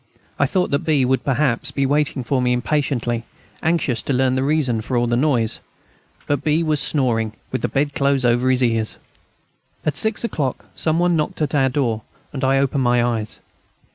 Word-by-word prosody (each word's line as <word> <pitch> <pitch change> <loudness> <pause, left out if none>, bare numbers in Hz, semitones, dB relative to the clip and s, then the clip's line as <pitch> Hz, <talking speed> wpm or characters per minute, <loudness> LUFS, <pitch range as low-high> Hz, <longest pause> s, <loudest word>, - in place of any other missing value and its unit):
I - - +3
thought 185 -2 0
that 140 - +2
B. 145 -5 +1
would 130 +1 +1
perhaps 135 0 0
be 140 0 -1
waiting 145 -1 0
for 130 +2 0
me 125 0 +2
impatiently, 125 -3 -1 0.4
anxious 160 -8 0
to 140 - -2
learn 130 0 +2
the 130 - 0
reason 135 -5 +1
of 110 - -7
all 120 -1 +2
the 120 0 0
noise. 120 -4 +1 0.7
But 145 -1 -1
B. 155 +2 +2
was 155 -2 +1
snoring 115 -8 0 0.2
with 130 - -2
the - - 0
bed 145 +1 -1
clothes 140 -2 +1
over 120 +2 +2
his 130 0 +3
ears. 115 -2 0 0.9
At 150 - 0
six 220 0 +2
o'clock 145 - -2
some 160 0 +1
one 175 0 +2
knocked 155 -2 -2
at 145 - -2
our 135 -2 +3
door, 125 -5 -1 0.3
and 135 -1 -4
I 135 +1 +3
opened 135 0 +1
my 120 -1 +3
eyes. 115 -3 -2
135 Hz, 195 wpm, -21 LUFS, 120-150 Hz, 0.9 s, I